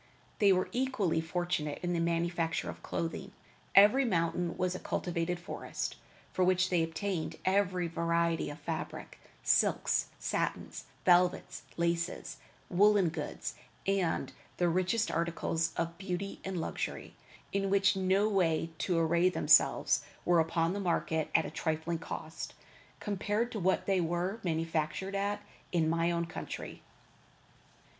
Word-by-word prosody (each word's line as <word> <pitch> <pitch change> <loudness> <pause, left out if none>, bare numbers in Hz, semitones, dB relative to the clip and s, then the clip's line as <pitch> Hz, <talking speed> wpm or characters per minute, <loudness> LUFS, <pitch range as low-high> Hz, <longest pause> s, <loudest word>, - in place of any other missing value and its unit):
They 200 -3 +6
were 185 0 +2
equally 245 -11 0
fortunate 165 -3 -2
in 175 0 0
the 170 - 0
manufacture 170 0 0
of - - -14
clothing. 190 +4 -4 0.4
Every 210 +8 +7
mountain 175 -5 0
was 185 0 0
a 185 - -5
cultivated 175 0 -2
forest, 175 - -5 0.4
from 185 -1 +2
which 185 0 +3
they 175 -2 +3
obtained 165 +1 -2
every 185 -2 +2
variety 170 0 0
of 145 - -7
fabric; - - -5 0.2
silks, - - +2
satins, - - -3 0.2
velvets, 180 0 +3 0.2
laces, 170 +1 -1 0.3
woolen 200 -1 +4
goods, 155 -2 -5 0.3
and 195 -4 0 0.2
the 175 - +2
richest 185 +6 +1
articles 165 -1 0
of 170 0 -1
beauty 190 +1 -4
and 190 -2 -3
luxury, 160 - -4 0.4
in 195 0 0
which 195 0 +4
to 185 -4 +1
array 170 +2 +3
themselves, - - +4 0.2
were 175 -2 +5
put 160 - -10
upon 165 +1 +1
the 200 - -3
market 165 -4 0
at - - +5
a - - -5
trifling 160 +1 -2
cost, 160 0 -6 0.4
compared 210 +3 -1
to 215 - -3
what 190 +1 +1
they 190 -2 +2
were 175 +5 -1
manufactured 165 +2 -1
at 205 +1 -1 0.3
in 165 -3 +2
my 165 +1 +2
own 170 0 0
country. 165 - -7
175 Hz, 135 wpm, -32 LUFS, 165-195 Hz, 0.4 s, Every